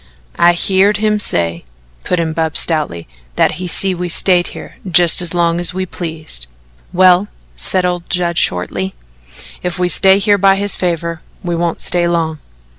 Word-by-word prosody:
"I 175 0 +5
heerd 195 +3 +1
him 210 0 0
say," 85 - 0 0.4
put 180 - -1
in 160 -1 -2
Bub 160 -1 -2
stoutly, 150 - +1 0.3
"that - - +2
he'd 180 - -4
see 190 +2 +2
that 175 - -8
we 180 0 -3
stayed 175 0 +3
here - - -11
jus' 175 0 +5
as 175 0 -1
long 170 0 +1
as 175 +1 0
we 185 0 -2
pleased." 160 - -6 0.4
"Well," 185 +1 +4 0.3
said 185 -1 +2
old 175 -1 -3
Judd 175 -2 -1
shortly, 95 +2 -2 0.7
"ef 180 +1 -3
we 180 0 0
stay 190 +2 +5
here 205 0 +2
by 195 0 +4
his 200 +1 -1
favour, 170 -2 -3 0.2
we 175 -1 -3
won't 170 0 -3
stay 175 -1 +1
long." 165 -2 -2
175 Hz, 175 wpm, -14 LUFS, 165-185 Hz, 0.7 s, I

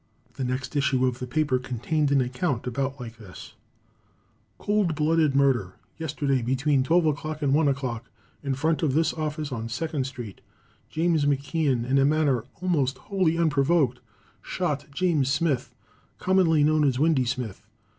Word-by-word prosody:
The 135 - -4
next 130 +2 -3
issue 135 -2 +2
of 125 -1 -1
the 125 - -5
paper 145 -1 +1
contained 140 +4 -1
an 140 -1 +4
account 125 0 -2
about 135 +2 -2
like 115 -2 -8
this: 100 -4 -12 1.0
Cold 205 -6 0
Blooded 155 -1 +2
Murder. 125 -10 +2 0.2
Yesterday, 145 -4 -1
between 135 +3 +1
12 155 0 +2 0.2
and 135 -1 +2
1 155 +1 +3
o'clock, 130 -4 -2 0.3
in 140 -2 -2
front 160 +4 0
of 145 -5 +1
this 160 0 +2
office 155 -2 -3
on 115 -2 -4
Second 145 +2 -2
street, 120 -7 -8 0.5
James 160 -2 +1
McKeon, 140 -3 0
in 135 +1 +3
a 135 - +4
manner 145 -5 +2 0.2
almost 140 -8 +1
wholly 175 +1 0
unprovoked, 145 -4 +2 0.4
shot 150 -6 -3
James 145 -3 +1
Smith, 135 -5 0 0.4
commonly 180 -5 +3
known 155 0 +3
as 135 -4 +2
Windy 145 -3 +2
Smith. 120 -5 -4
140 Hz, 150 wpm, -26 LUFS, 130-155 Hz, 1.0 s, an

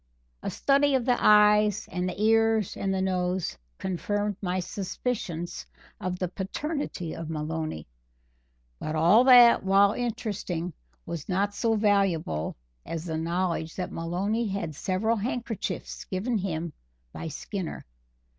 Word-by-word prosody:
A - - -3
study 280 0 +3
of 250 -3 +1
the 250 -2 +1
eyes 210 -1 +5
and 180 0 -1
the 180 - -7
ears 225 -1 +3
and 195 - -1
the 190 0 0
nose 180 - -1 0.2
confirmed 205 +3 -2
my 185 -1 -1
suspicions 180 -2 -4 0.3
of 180 0 -3
the 180 - -1
paternity 190 - -4
of 165 -1 -6
Maloney; 155 - -3 0.9
but 155 - -3
all 175 +10 +6
that, 245 -2 +8
while 195 +1 +5
interesting, 200 -8 -3 0.3
was 165 0 -6
not 200 +2 +1
so 225 +2 +1
valuable 195 - +1 0.3
as 165 0 -5
the 160 -2 -2
knowledge 170 -1 -1
that 180 - -4
Maloney 195 +7 -1
had 190 -5 -3
several 195 +9 0
handkerchiefs 230 0 -4
given 210 +5 -1
him 170 -4 -3 0.4
by - - -5
Skinner. 170 +4 -5
190 Hz, 130 wpm, -27 LUFS, 170-215 Hz, 0.9 s, that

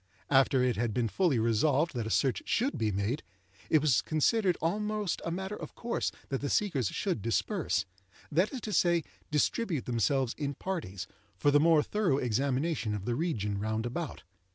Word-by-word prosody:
After 135 -1 +4
it 125 -4 +1
had 115 -2 -1
been 120 -2 +1
fully 170 - +1
resolved 130 +8 +2
that 120 -4 -2
a - - -3
search 130 +3 +1
should 255 +5 +1
be 110 -1 0
made, 100 +9 -1 0.5
it 155 - +4
was 140 -6 +4
considered 180 +4 +2
almost 210 +3 -1
a - - -2
matter 190 +4 -3
of - - -9
course 235 0 -2 0.2
that 135 -2 -2
the 140 - -2
seekers 150 - +1
should 180 - -2
disperse—that 100 - -1
is 260 - -5
to 215 - -4
say, 170 -3 +3 0.3
distribute 155 - 0
themselves 125 +2 +1
in 140 -2 -2
parties—for 105 - -3
the 145 - +5
more 160 -1 +5
thorough 200 -9 +1
examination 130 0 0
of 100 -1 -5
the 120 - 0
region 110 - -1
round 110 +2 -1
about. 145 +5 -4
140 Hz, 170 wpm, -30 LUFS, 115-170 Hz, 0.5 s, the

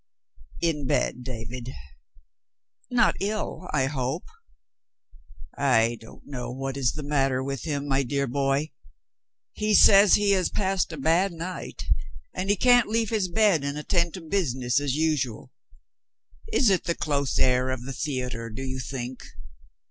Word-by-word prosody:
"In 150 -5 0
bed, 125 - 0
David." 125 +1 -6 1.2
"Not 245 -1 +3
ill, 205 -2 -3
I 135 -3 +2
hope?" 135 -2 -2 1.3
"I 120 -4 +3
don't 115 - -15
know 125 -4 -6
what 135 +1 -4
is 135 -3 +1
the 150 - -6
matter 135 -3 +1
with 135 0 -4
him, 145 -2 -2
my 135 -1 +2
dear 140 +1 -1
boy. 140 +3 0 0.8
He 210 0 +1
says 200 -1 +8
he 205 -1 +2
has 185 -2 +2
passed 190 -3 0
a 165 - -6
bad 165 +7 +2
night, 175 +2 -6 0.5
and 185 +2 -3
he 205 - +4
can't 245 +2 +4
leave 225 0 0
his 210 -4 +1
bed 185 -4 +3
and 140 +1 -3
attend 170 +3 0
to 185 - -7
business 135 -8 0
as 145 -2 -1
usual. 150 -7 -1 1.0
Is 240 -7 +4
it 185 - +1
the 170 0 0
close 140 -2 -1
air 125 0 +3
of 130 -2 -3
the 135 +2 -6
theater, 125 -4 -3
do 115 +5 -6
you 130 0 -4
think?" 130 -1 -6
140 Hz, 150 wpm, -26 LUFS, 130-180 Hz, 1.3 s, says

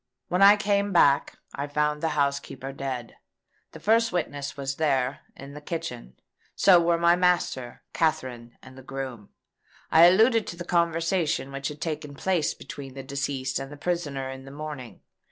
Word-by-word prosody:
When 180 +2 0
I 200 +1 +9
came 200 0 0
back, 140 -6 +3 0.2
I 140 +1 -4
found 150 +1 0
the 160 -2 -1
housekeeper 140 -1 -2
dead. 130 -3 -5 0.5
The - - -11
first 225 +1 +3
witness 145 -5 -3
was 135 0 -3
there, 135 -4 +1 0.2
in 140 +1 -10
the 150 - -9
kitchen. 145 - -6 0.4
So 180 -3 +6
were 170 0 +2
my 170 +1 +4
master, 175 -9 0
Katherine, 125 -7 -2
and 130 0 -13
the 130 - -11
groom. 130 -5 -7 0.6
I 165 +1 +8
alluded 220 +5 +5
to - - -5
the 175 0 -7
conversation 165 -4 0
which 135 0 -4
had 150 0 -8
taken 150 -3 -4
place 175 0 0
between 135 -2 -9
the 135 - -7
deceased 135 -1 -2
and 135 +1 -7
the 145 - -9
prisoner 145 -5 -2
in 130 0 -9
the - - -10
morning. 145 -4 -8
145 Hz, 170 wpm, -26 LUFS, 135-170 Hz, 0.6 s, I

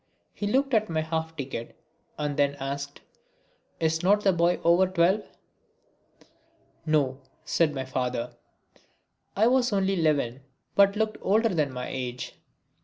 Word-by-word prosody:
He 205 - -3
looked 265 +5 +1
at 215 -1 +2
my 160 -1 0
half 160 0 -3
ticket 130 -5 -6 0.4
and 150 -1 -2
then 140 0 +2
asked: 140 +1 -5 0.8
"Is 160 0 +1
not 205 +3 +4
the 195 -2 +3
boy 170 +1 +2
over 175 +3 +5
twelve?" 185 +3 +2 1.7
"No," 140 -4 +1 0.3
said 155 -3 +1
my 130 -1 -3
father. 125 -2 -2 1.0
I 210 - +4
was 250 +1 +3
then 205 - 0
only 195 +1 +1
eleven, 140 -5 +1 0.3
but 200 0 +5
looked 215 0 -1
older 220 +4 +3
than 155 -8 0
my 125 -1 -5
age. 125 -2 -5
160 Hz, 140 wpm, -27 LUFS, 140-200 Hz, 1.7 s, over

